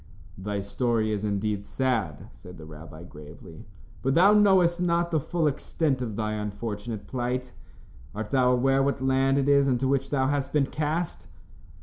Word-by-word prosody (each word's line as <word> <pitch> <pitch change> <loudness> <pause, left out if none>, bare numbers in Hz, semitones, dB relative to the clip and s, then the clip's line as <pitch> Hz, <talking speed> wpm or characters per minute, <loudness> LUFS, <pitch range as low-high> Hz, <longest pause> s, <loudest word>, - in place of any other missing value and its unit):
"Thy 100 +1 -3
story 110 +2 -1
is 105 -1 -2
indeed 105 0 -1
sad," 115 - -2
said 90 0 -13
the 80 - -11
rabbi, 80 +1 -11
gravely, 80 +2 -13 0.3
"but 135 +1 0
thou 190 +5 +6
knowest 190 -4 +4
not 170 -1 +1
the 160 - +2
full 165 +3 -2
extent 145 -1 -1
of 115 -4 -4
thy 110 0 -2
unfortunate 105 +1 -5
plight. 125 0 -3 0.6
Art 105 0 -5
thou 125 -2 +3
aware 135 +2 +2
what 140 0 0
land 135 +1 +2
it 140 0 +1
is 140 -1 +4
into 130 0 +1
which 135 0 0
thou 135 -2 +1
hast 140 0 -1
been 145 -2 +3
cast?" 155 +4 -3
130 Hz, 165 wpm, -26 LUFS, 105-140 Hz, 0.6 s, thou